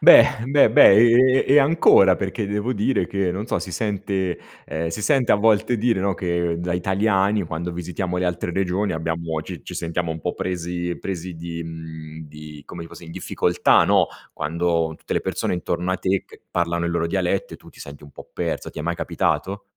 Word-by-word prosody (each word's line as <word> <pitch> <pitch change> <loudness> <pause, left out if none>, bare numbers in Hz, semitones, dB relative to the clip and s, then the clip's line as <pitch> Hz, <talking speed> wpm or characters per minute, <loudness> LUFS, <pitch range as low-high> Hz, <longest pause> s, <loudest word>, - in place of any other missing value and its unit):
Beh - - +9 0.2
beh 140 -5 +5
beh, 105 - +8
e 125 +3 +5
e 140 +2 +6
ancora 135 - +5
perché 100 +2 -3
devo 105 +5 -2
dire 105 -3 0
che, 100 -2 -1
non 100 +5 -4
so, 125 - -1
si 95 - -7
sente 95 -2 -2 0.3
ehm, 80 +1 -3
si 85 +6 -5
sente 135 0 +2
a - - +7
volte 110 +3 +2
dire, 115 -2 +1
no, 100 0 0
che 85 -2 -1
da 85 +1 -3
italiani, 100 +2 +1
quando 80 +1 -4
visitiamo 90 +1 -4
le 90 - 0
altre 90 0 -2
regioni, 95 +2 -1
abbiamo 80 -1 -3
ci 85 -5 -9
ci - - -9
sentiamo 85 0 -3
un 80 - -5
po’ 90 - -2
presi 90 -1 -3
presi 90 -2 -5
di 85 0 -6
mhmm, 80 -1 -9
di, 75 -1 -11
come 85 - -9
ti 85 - -10
posso 85 - -12
in 80 - -11
difficoltà, - - +2
no, - - +3 0.3
quando 85 +1 -1
tutte - - -7
le - - +1
persone - - -2
intorno 90 0 -2
a 95 - 0
te 95 +1 0
che - - -17
parlano 85 -1 -1
i - - -1
loro 85 -1 -1
dialetti, 95 +2 -1
e - - -9
tu - - -17
ti - - -18
senti 70 0 -10
un 75 - -13
po’ - - -12
perso. - - -3
Ti - - -10
è - - -4
mai 85 +2 -1
capitato? 100 +4 -2
90 Hz, 210 wpm, -22 LUFS, 85-100 Hz, 0.3 s, Beh